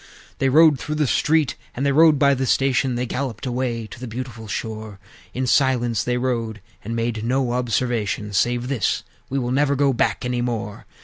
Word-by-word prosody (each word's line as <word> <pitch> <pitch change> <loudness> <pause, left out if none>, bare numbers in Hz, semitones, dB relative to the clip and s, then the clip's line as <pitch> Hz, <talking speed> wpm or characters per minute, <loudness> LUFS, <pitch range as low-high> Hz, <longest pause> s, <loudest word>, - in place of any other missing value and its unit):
VI. - - -22
They 135 - +2
rode 155 0 +6
through 150 0 -4
the 150 -1 +1
street, 155 +2 +2 0.2
and 135 - -2
they 140 - +3
rode 155 +1 +6
by 140 0 +4
the 130 -1 -1
station; 135 -1 +2
They 125 +1 -1
galloped 125 -2 -4
away 120 -2 -2
to 110 - -11
the 125 - -6
beautiful 115 -1 -7
shore; 110 0 -5 0.4
In 130 +1 -1
silence 120 -3 +2
they 125 0 0
rode, 115 -4 -2 0.2
and 115 +3 -4
"made 115 -1 -2
no 125 +1 0
observation," 115 -4 -1
Save 120 +4 +1
this: 130 -7 0 0.3
"We 135 - -2
will 125 -2 -1
never 140 +2 +2
go 140 0 +2
back 120 - 0
any 125 -1 -1
more!" 115 -4 -4
125 Hz, 195 wpm, -22 LUFS, 115-135 Hz, 0.4 s, rode